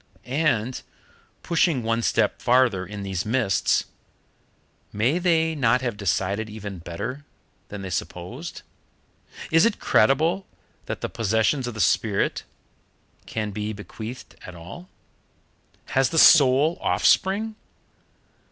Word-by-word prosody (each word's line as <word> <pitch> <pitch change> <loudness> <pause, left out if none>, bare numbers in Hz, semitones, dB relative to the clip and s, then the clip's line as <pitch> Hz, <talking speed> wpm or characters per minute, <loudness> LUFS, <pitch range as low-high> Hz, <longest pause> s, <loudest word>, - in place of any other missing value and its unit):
And 130 -3 0 0.6
pushing 165 -6 +1
one 115 +1 0
step - - 0
farther 120 -7 +2
in 100 +1 -7
these 95 -2 -3
mists 110 -4 +1 1.1
may 120 +11 +1
they 165 -2 +2
not 125 -4 +2
have 120 -4 -2
decided 100 +2 -1
even 105 -3 -7
better 100 - -6 0.4
than 100 -1 -8
they 95 - -6
supposed? - - -6 0.9
Is 165 +1 +5
it 230 -2 +2
credible 165 +8 +2 0.4
that - - -5
the - - -2
possessions 115 +4 0
of 120 - -6
the - - -7
spirit 90 - +1 0.8
can 110 -2 -3
be 105 +1 -4
bequeathed 110 +4 -9
at 90 - -10
all? 90 - -11 1.0
Has 135 0 +2
the 165 - -3
soul 150 +1 +6
offspring? 210 +3 +2
120 Hz, 115 wpm, -24 LUFS, 105-150 Hz, 1.1 s, soul